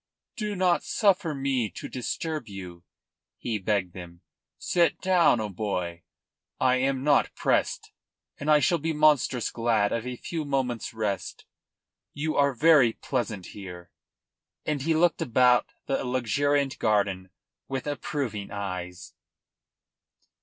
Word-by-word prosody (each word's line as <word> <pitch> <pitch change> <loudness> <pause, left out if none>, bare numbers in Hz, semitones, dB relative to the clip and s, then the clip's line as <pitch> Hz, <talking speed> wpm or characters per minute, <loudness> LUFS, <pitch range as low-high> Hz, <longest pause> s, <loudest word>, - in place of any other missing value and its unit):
"Do 210 -3 -3
not 180 -2 +2
suffer 190 -7 +1
me 135 -5 0
to - - -6
disturb 150 +2 -4
you," 90 -4 -9 0.5
he 115 -3 -3
begged 95 -2 -1
them. 85 -1 -10 0.4
"Sit 170 -3 +1
down, 180 -9 +4
O'Moy. 90 -4 -3 0.6
I 130 0 +3
am 135 0 0
not 145 -1 +3
pressed, - - 0 0.5
and 145 - -3
I 150 - +7
shall 170 +1 +2
be 160 +2 -1
monstrous 150 -5 +3
glad 115 -3 +1
of 115 +1 -2
a 125 - -4
few 160 +5 -4
moments' 130 -5 -2
rest. 105 -3 -3 0.7
You 155 +2 -2
are 140 -2 +3
very 145 -5 +5
pleasant 115 -9 -3
here," 90 -3 -9 0.7
and 150 -2 -1
he 160 +3 +1
looked 170 +1 +2
about 125 0 +4 0.2
the 135 - -1
luxuriant 135 +3 0
garden 100 -4 +1 0.4
with 135 -1 -4
approving 140 -7 -3
eyes. 90 -3 -6
125 Hz, 125 wpm, -27 LUFS, 105-150 Hz, 0.7 s, I